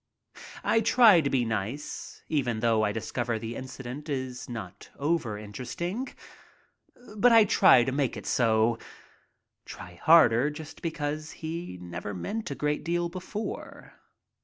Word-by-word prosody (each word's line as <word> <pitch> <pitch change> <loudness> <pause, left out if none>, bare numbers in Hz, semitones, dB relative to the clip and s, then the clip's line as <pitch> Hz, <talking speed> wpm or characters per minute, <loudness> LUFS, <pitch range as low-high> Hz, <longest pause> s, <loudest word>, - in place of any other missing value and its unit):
I 225 - +3
try 220 -6 +6
to 140 - -1
be 130 -3 +1
nice, 110 +6 -5
even 125 -8 -1
though 115 -2 +3
I 105 -1 +1
discover 115 +2 -2
the 115 +1 -6
incident 130 +3 -7
is 130 -2 -4
not 105 -7 -8
overinteresting. 145 - -3 1.0
But 235 +4 +5
I 225 -1 +8
try 190 - +6
to 130 - -1
make 135 -1 -1
it - - -8
so 115 -1 +2 0.4
— - - -46
try 90 -1 -10
harder 150 -5 +6
just 150 0 -9
because 155 -2 -3
he 165 - -6
never 90 +3 -6
meant 215 - -4
a 140 - -4
great 150 +2 -1
deal 170 +1 -1
before. 185 +4 -7
135 Hz, 135 wpm, -28 LUFS, 115-165 Hz, 1.0 s, I